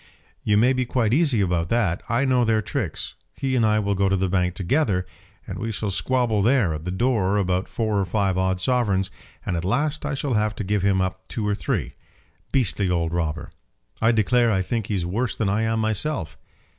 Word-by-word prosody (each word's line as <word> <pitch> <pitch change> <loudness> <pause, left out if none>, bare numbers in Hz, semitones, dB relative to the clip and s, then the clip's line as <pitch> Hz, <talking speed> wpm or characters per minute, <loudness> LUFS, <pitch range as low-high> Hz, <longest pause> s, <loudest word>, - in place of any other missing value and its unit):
"You 105 -1 +2
may 125 +5 +4
be 130 0 0
quite 120 -2 0
easy 140 -7 +3
about 85 -3 0
that. 100 -7 +1
I 120 +4 +2
know 130 -2 +3
their 110 -2 +2
tricks. - - -4 0.2
He 135 -1 -1
and 120 - +2
I 110 -1 +3
will 100 -1 0
go 100 0 +1
to 95 - +2
the 95 0 0
bank 90 -1 0
together, 100 - 0 0.4
and - - -6
we 115 +1 -3
shall 105 0 -3
squabble 120 0 +1
there 115 -6 +3
at 75 +1 -6
the - - -2
door 105 -1 +1
about 95 -1 0
four 110 -3 -1
or 100 - +1
five 95 0 0
odd 95 0 0
sovereigns, 100 -4 +1 0.3
and - - -1
at 85 - -2
last 145 - 0
I 145 -1 -2
shall 135 -1 -2
have 105 -1 +1
to - - -4
give 100 +1 0
him 95 -1 +2
up 95 0 -3
two 110 -3 -3
or 105 - +1
three. - - -2 0.6
Beastly 105 -7 +1
old 85 -2 0
robber! 80 -3 -2 0.5
I 110 +1 +4
declare 120 +2 +3
I 95 -2 +1
think 110 +1 -2
he's 95 -5 -1
worse 115 +8 -2
than 105 -3 0
I 105 +3 +1
am 115 0 0
myself." 110 - -1
105 Hz, 215 wpm, -23 LUFS, 95-120 Hz, 0.6 s, may